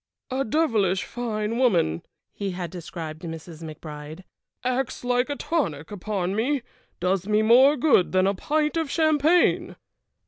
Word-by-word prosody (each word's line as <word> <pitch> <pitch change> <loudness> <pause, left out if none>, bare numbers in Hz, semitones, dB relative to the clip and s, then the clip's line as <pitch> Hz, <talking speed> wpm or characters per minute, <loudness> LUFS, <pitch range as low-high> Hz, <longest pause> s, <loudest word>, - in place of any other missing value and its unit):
"A 265 +1 0
devilish 220 - +1
fine 230 -1 -3
woman," 175 - +2 0.3
he 200 -1 -3
had 180 -3 -5
described 165 -3 -7
Mrs. 165 -1 -8
McBride. 155 +1 -8 0.4
"Acts 255 0 -1
like 245 +2 +1
a 285 - -1
tonic 165 - -2
upon 195 -2 -2
me; 255 +4 0 0.4
does 185 +1 0
me 215 0 +3
more 260 +6 +6
good 250 - +3
than 185 0 +3
a 195 - +2
pint 300 - 0
of 325 -3 -1
champagne!" 315 +2 +3
215 Hz, 140 wpm, -25 LUFS, 175-265 Hz, 0.4 s, more